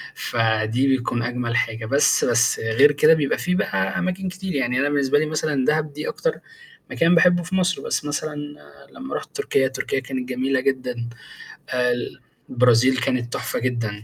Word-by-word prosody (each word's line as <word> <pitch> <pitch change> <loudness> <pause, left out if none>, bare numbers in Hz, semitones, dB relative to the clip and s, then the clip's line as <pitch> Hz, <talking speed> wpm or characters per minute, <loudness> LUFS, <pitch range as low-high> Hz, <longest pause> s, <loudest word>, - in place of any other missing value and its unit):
فدي 115 +2 0
بيكون 120 -3 0
أجمل 120 -1 -2
حاجة 115 -2 -1
بس 140 +6 +3
بس 120 0 +2
غير 115 +6 +4
كده 150 +2 +5
بيبقى 150 -4 0
في 180 0 -1
بقى 95 - -1
أماكن 185 0 -2
كتير، 185 -1 -6
يعني 125 -2 0
أنا 140 +1 +1
بالنسبة 145 0 +2
لي 155 - 0
مثلًا 155 -3 -1
دهب 155 -1 0
دي 150 +1 -5
أكتر - - -2 0.6
مكان 170 +1 +3
باحبّه 175 +1 +4
في 180 +3 -4
مصر، 185 -1 +1
بس - - -2
مثلًا 150 +1 -3 0.6
لمّا 265 +2 -7
رُحت - - -7
تركيا، 140 - +1
تركيا 130 0 -2
كانت 130 -1 -5
جميلة 130 +1 0
جدًا 125 -3 -2 0.6
آآ، 125 -1 +1
ال 120 0 -4 0.3
البرازيل 125 +1 +4
كانت 120 -1 -1
تحفة - - -3
جدًا، 115 -4 -3
130 Hz, 170 wpm, -22 LUFS, 120-155 Hz, 0.6 s, كده